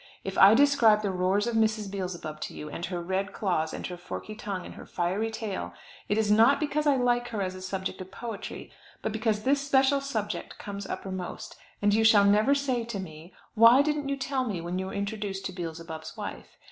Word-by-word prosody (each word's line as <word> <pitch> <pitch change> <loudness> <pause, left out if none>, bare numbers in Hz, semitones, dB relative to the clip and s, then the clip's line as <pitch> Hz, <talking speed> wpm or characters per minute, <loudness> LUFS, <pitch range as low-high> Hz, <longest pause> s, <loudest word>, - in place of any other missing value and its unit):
If 195 0 -4
I 200 +3 +8
describe 235 -6 +5
the 200 - 0
roars 185 +3 +1
of 235 - -1
Mrs. 215 -2 +1
Beelzebub 180 -5 -5
to - - -5
you, 150 0 -7
and 170 - -6
her 175 -1 -3
red 190 +3 -2
claws, 175 -6 0
and - - -6
her 180 - -5
forky 180 +4 -7
tongue, 200 -4 -5
and - - -9
her - - -11
fiery 185 +6 -1
tail, 220 -3 -5 0.3
it 205 - +1
is 215 -1 +2
not 230 +6 +6
because 300 0 0
I 285 - +5
like 245 -1 +1
her 225 -3 -4
as 185 -1 -2
a 185 - -9
subject 190 0 -4
of 185 - -8
poetry, 225 +1 -7 0.3
but 220 - -1
because 220 -1 0
this 275 +2 +2
special 275 0 +3
subject 215 -9 -4
comes 200 -1 -6
uppermost; 185 -2 -6 0.3
and 205 0 +4
you 220 +1 +3
shall 215 -2 +6
never 215 +7 +4
say 260 -4 0
to 230 -3 -5
me, 165 -1 -9 0.2
why 230 +4 +7
didn't 295 -1 -1
you 275 - -1
tell 270 -1 -1
me 210 -8 -3
when 175 +2 -3
you 190 - -3
were - - -7
introduced 200 -1 -3
to - - -2
Beelzebub's 165 -2 -7
wife? - - -7
205 Hz, 215 wpm, -28 LUFS, 185-235 Hz, 0.3 s, I